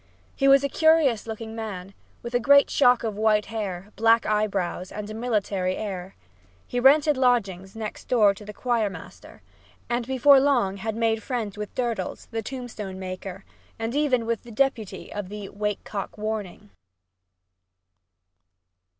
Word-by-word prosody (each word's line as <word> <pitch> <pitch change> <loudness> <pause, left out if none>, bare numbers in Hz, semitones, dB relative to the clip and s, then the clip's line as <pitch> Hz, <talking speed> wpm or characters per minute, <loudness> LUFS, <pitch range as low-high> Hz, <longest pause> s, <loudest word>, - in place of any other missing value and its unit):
He 275 - +2
was 275 0 +6
a - - +2
curious 300 -7 +3
looking 220 0 -6
man, 200 -4 -6 0.3
with 235 +1 -6
a 245 - +3
great 280 +3 +5
shock 250 -3 +4
of 220 -3 -2
white 215 -1 +3
hair, 205 -3 -5
black 225 +1 +4
eyebrows 200 -4 -1
and 210 0 -6
a 215 - -7
military 205 -5 -1
air. 190 -3 -5 0.5
He 245 - -2
rented 285 +3 +5
lodgings 200 -7 +1
next 220 -1 -6
door 215 -5 +4
to 200 - -12
the 210 - -8
choir 230 -2 0
master, - - -12 0.5
and 240 0 -1
before 265 +1 +6
long 245 -9 +2
had 220 +2 -4
made 225 -1 +1
friends 225 -6 -3
with 210 0 -7
Durdles, 230 -7 -3
the 225 0 -2
tombstone 220 -6 -7
maker, 185 +1 -7 0.3
and 225 +1 -3
even 270 -5 +1
with 230 -1 -1
The 240 - -14
Deputy 235 -3 -1
of 205 -3 -5
the 205 -1 -7
"wake 210 0 -3
cock 200 0 -6
warning." 210 - -5
220 Hz, 155 wpm, -25 LUFS, 200-245 Hz, 0.5 s, was